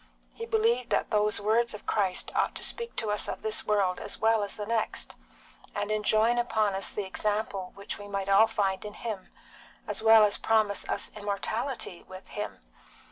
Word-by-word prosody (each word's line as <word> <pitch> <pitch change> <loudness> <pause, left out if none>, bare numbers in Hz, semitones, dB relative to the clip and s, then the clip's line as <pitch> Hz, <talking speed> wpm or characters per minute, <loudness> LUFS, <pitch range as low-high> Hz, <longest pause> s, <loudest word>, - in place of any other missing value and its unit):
He 460 - -7
believed 450 +1 +2
that - - 0
those 210 -1 +2
words 220 +2 +1
of 210 - -11
Christ 195 -4 0
ought - - +1
to - - -3
speak 470 -1 -2
to 215 -2 -1
us 210 - +1
of - - -5
this 220 0 0
world 195 -4 +2
as - - -1
well 225 0 +3
as 205 - -3
the 210 - -5
next, 225 0 -2 0.6
and 205 +1 -2
enjoin 215 +2 +3
upon 220 -4 +1
us 195 +1 +1
the 205 - -3
example 205 -1 -1
which 200 +1 -6
we 205 - -8
might 195 -1 -3
all 200 +3 +6
find 195 -3 -1
in 210 0 -8
Him, 215 -5 -5 0.6
as - - -2
well 220 -1 +8
as 205 - +1
promise 215 -2 +1
us - - -1
immortality 210 +1 -3
with 185 0 -12
Him. - - -5
210 Hz, 190 wpm, -28 LUFS, 200-225 Hz, 0.6 s, well